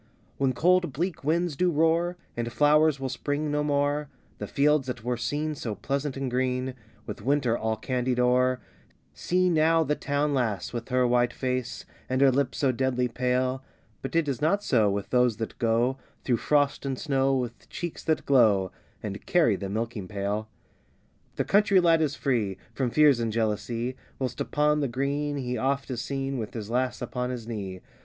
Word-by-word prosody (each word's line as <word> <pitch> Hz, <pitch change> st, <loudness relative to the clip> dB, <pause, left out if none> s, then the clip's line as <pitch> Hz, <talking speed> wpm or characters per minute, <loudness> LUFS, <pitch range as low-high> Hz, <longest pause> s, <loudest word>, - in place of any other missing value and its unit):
When 135 Hz, -1 st, +1 dB
cold 175 Hz, +1 st, +2 dB
bleak 170 Hz, +2 st, -3 dB
winds 165 Hz, +2 st, +1 dB
do 180 Hz, +4 st, +2 dB
roar, 165 Hz, +2 st, +2 dB, 0.2 s
And 120 Hz, 0 st, -3 dB
flowers 150 Hz, +2 st, +4 dB
will 135 Hz, -, -2 dB
spring 145 Hz, +4 st, -2 dB
no 150 Hz, 0 st, +1 dB
more, 145 Hz, 0 st, 0 dB, 0.3 s
The -, -, -4 dB
fields 145 Hz, -1 st, +2 dB
that 120 Hz, -3 st, -5 dB
were 125 Hz, +1 st, -1 dB
seen 150 Hz, +6 st, -2 dB
so 115 Hz, -7 st, -4 dB
pleasant 140 Hz, +4 st, -3 dB
and 135 Hz, 0 st, -2 dB
green, 130 Hz, +1 st, -1 dB, 0.3 s
With -, -, -7 dB
winter 130 Hz, -3 st, +1 dB
all 110 Hz, -1 st, -1 dB
candied 125 Hz, +2 st, -1 dB
o'er, 125 Hz, +1 st, +3 dB, 0.5 s
See 185 Hz, +1 st, +1 dB
now 165 Hz, -1 st, +3 dB
the 150 Hz, -1 st, 0 dB
town 145 Hz, +1 st, -1 dB
lass, 110 Hz, -8 st, -1 dB
with 120 Hz, 0 st, -5 dB
her 125 Hz, 0 st, +2 dB
white 120 Hz, 0 st, +2 dB
face, 125 Hz, -2 st, -3 dB, 0.2 s
And 130 Hz, 0 st, 0 dB
her 135 Hz, -1 st, +6 dB
lips 130 Hz, 0 st, 0 dB
so 135 Hz, -2 st, +2 dB
deadly 125 Hz, 0 st, 0 dB
pale; 125 Hz, +2 st, 0 dB, 0.4 s
But 135 Hz, -, -5 dB
it 165 Hz, -2 st, +2 dB
is 135 Hz, -4 st, -2 dB
not 200 Hz, +7 st, +2 dB
so, 110 Hz, -, +3 dB
with 100 Hz, 0 st, -3 dB
those 125 Hz, -3 st, +3 dB
that 115 Hz, -, -5 dB
go 120 Hz, +3 st, +1 dB, 0.2 s
Through 120 Hz, -3 st, +1 dB
frost 145 Hz, +2 st, +1 dB
and 135 Hz, -2 st, -2 dB
snow, 135 Hz, -2 st, +1 dB
with 120 Hz, -2 st, -4 dB
cheeks 175 Hz, -2 st, -5 dB
that 160 Hz, -1 st, 0 dB
glow, 105 Hz, -9 st, +4 dB, 0.3 s
And 100 Hz, -1 st, -5 dB
carry 160 Hz, -, +4 dB
the 95 Hz, 0 st, -5 dB
milking 110 Hz, -2 st, -3 dB
pail. 105 Hz, +2 st, -3 dB, 0.9 s
The -, -, 0 dB
country 200 Hz, -1 st, +4 dB
lad 165 Hz, -2 st, +4 dB
is 150 Hz, -2 st, 0 dB
free 115 Hz, -11 st, -1 dB, 0.2 s
From 130 Hz, -3 st, -1 dB
fears 145 Hz, -1 st, +5 dB
and 115 Hz, -1 st, -1 dB
jealousy, 115 Hz, +3 st, -1 dB, 0.2 s
Whilst 130 Hz, -2 st, -3 dB
upon 150 Hz, 0 st, +1 dB
the 140 Hz, -, 0 dB
green 140 Hz, +3 st, -2 dB
he 125 Hz, -3 st, -3 dB
oft 135 Hz, +2 st, -1 dB
is 120 Hz, -2 st, -3 dB
seen, 135 Hz, 0 st, -3 dB
With 110 Hz, 0 st, -6 dB
his 110 Hz, -1 st, -5 dB
lass 125 Hz, +1 st, -1 dB
upon 125 Hz, 0 st, -3 dB
his 125 Hz, -3 st, -5 dB
knee. 95 Hz, -5 st, -5 dB
130 Hz, 185 wpm, -27 LUFS, 120-145 Hz, 0.9 s, her